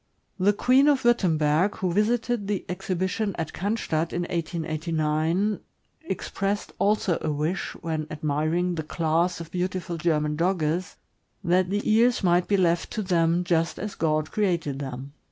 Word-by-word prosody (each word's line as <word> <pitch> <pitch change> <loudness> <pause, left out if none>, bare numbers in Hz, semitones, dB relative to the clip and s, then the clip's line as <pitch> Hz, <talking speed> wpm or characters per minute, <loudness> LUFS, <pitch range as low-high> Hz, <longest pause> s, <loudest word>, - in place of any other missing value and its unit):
The 195 +3 +4
Queen 255 +6 +4
of 285 -3 +3
Wurtemberg, 175 -5 +3
who 180 -2 -1
visited 225 +1 +1
the 205 -2 -2
exhibition 190 +3 -2
at 165 - -4
Cannstadt, 175 -5 -1
in 175 - -1
1889, 165 +3 -1 0.5
expressed 195 +1 -3
also 200 -4 +2
a - - -1
wish, 155 +6 -2
when 155 -2 -3
admiring 155 +4 0
the 165 - -2
class 165 +3 0
of 165 -1 -8
beautiful 180 -1 -2
German 150 -2 +1
Dogges, 170 0 0 0.5
that 180 +1 +2
the 205 +1 -1
ears 230 +1 +3
might 175 0 +3
be 200 - +2
left 170 -2 +2
to 215 - -2
them 170 -1 +2
just 165 -1 0
as 210 +2 -4
God 155 -1 0
created 170 -9 0
them. 135 0 -6
175 Hz, 145 wpm, -25 LUFS, 160-195 Hz, 0.5 s, The